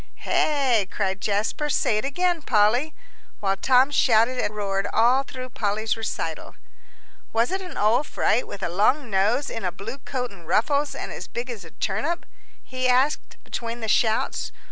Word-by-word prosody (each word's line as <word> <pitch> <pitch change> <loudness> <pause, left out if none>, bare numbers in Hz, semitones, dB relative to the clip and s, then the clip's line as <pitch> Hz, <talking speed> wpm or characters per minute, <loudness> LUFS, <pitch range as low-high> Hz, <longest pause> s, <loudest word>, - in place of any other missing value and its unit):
"Hey?" 260 -9 +1
cried 195 -1 -2
Jasper. 215 +9 -1
"Say 215 -5 +2
it - - -4
again, 350 +4 0
Polly," 245 +6 +2 0.4
while 195 -1 +1
Tom 255 +6 +4
shouted 250 -2 +3
and 210 - -1
roared 195 -1 -1
all 245 +4 +4
through 255 -2 -8
Polly's 215 -1 -1
recital. 225 0 -4 0.8
"Was 230 +2 +2
it 380 +1 -1
an 360 -3 -8
old 225 +7 +2
fright - - +1
with 195 - -8
a - - +1
long 220 - +2
nose 215 +9 +2
in 225 - -5
a 180 - 0
blue 225 +9 -7
coat 255 -3 -4
and 175 -5 -15
ruffles, 285 - +1
and - - -5
as - - -7
big 245 +1 -5
as 215 -5 -7
a 165 - -11
turnip?" 225 - -2 0.4
he 255 0 -1
asked 260 +4 +1
between 235 0 -5
the 220 - -3
shouts. 220 +1 +1
235 Hz, 170 wpm, -24 LUFS, 210-270 Hz, 0.8 s, Tom